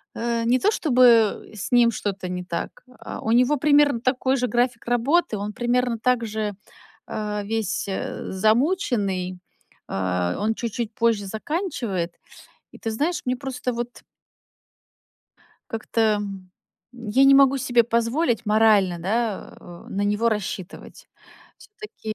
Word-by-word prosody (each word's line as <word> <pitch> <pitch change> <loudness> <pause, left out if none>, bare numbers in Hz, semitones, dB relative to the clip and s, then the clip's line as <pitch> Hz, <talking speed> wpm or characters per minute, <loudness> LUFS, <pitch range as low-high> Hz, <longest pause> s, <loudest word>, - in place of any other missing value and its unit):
э, 235 0 -1
не 245 +2 +3
то 415 - +3
чтобы, 245 - +4
э, - - -12
с 205 - -6
ним 240 -1 +5
что-то 195 -4 -4
не 180 0 -4
так, 170 -1 -5 0.2
а, - - -7
у 220 - -1
него 250 +5 +4
примерно 285 -3 +3
такой 260 +1 +1
же 250 0 0
график 245 +1 0
работы. 245 +2 +1
Он 205 +1 -4
примерно 245 0 0
так 245 0 +1
же, 215 -1 -3 0.5
э, 210 -1 -3
весь, 215 -1 -2
э, 190 - -4
замученный, 215 - 0 0.5
а, 90 -2 -1
он 220 +2 +1
чуть-чуть 230 -1 -4
позже 225 -3 +1
заканчивает. 220 - -3 0.6
И - - -13
ты 225 - -4
знаешь, 300 +10 -1
мне 250 0 0
просто 255 -1 -4
вот 240 +1 -6 1.7
Как-то, 225 +1 -3 0.2
м, 195 -3 -6 0.4
я 240 +2 +1
не 275 0 +7
могу 275 0 +6
себе 245 -2 +3
позволить 235 +2 0
морально, 210 -4 +4
да, 215 +4 -2
э, 175 -1 -12
на 200 - -2
него 210 +3 +1
рассчитывать. 205 -4 -5 0.5
Всё-таки, 420 - -9
230 Hz, 140 wpm, -23 LUFS, 205-250 Hz, 1.7 s, не